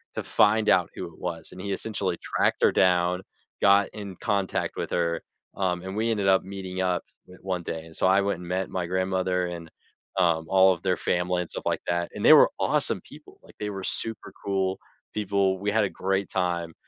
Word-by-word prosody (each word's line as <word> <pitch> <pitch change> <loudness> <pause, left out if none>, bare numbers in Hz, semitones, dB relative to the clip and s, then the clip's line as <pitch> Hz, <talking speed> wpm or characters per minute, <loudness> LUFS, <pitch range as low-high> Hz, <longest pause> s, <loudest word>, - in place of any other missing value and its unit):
to - - -3
find 105 +2 +3
out 90 -2 +4
who 90 - -5
it - - -19
was," 85 -2 -5
and 90 - -11
he 100 0 -2
essentially 95 -4 -2
tracked - - 0
her - - +6
down, 90 0 +3 0.4
got 100 0 +5
in 100 -3 -7
contact 100 -3 -1
with - - -3
her, 85 -1 0 0.3
um, 90 -2 0
and 95 +1 -5
we 115 +2 0
ended 100 -3 0
up 95 0 +4
meeting 95 -1 -5
up 90 -1 0 0.4
one 90 -2 -3
day, 80 -1 -4
and 80 - -15
so - - +2
I 95 +1 +5
went 100 -3 -1
and 90 - -9
met 95 +1 -2
my 90 -2 -2
grandmother 95 0 0
and, 85 -2 -7 0.5
um, 85 -3 +2
all 95 0 +6
of 85 - -9
their 90 -1 +1
family 90 0 0
and 90 - -6
stuff - - -6
like - - 0
that, 85 0 0
and - - -5
they - - +10
were - - +7
awesome - - 0
people, - - -15
like, - - -18
they 105 - -3
were 95 -1 -6
super 115 +3 -4
cool 95 -1 0 0.4
people, 100 -2 +1
we 100 +1 -1
had 110 -1 +3
a - - -2
great 95 +1 -1
time, 85 -3 -1
95 Hz, 215 wpm, -26 LUFS, 90-100 Hz, 0.5 s, they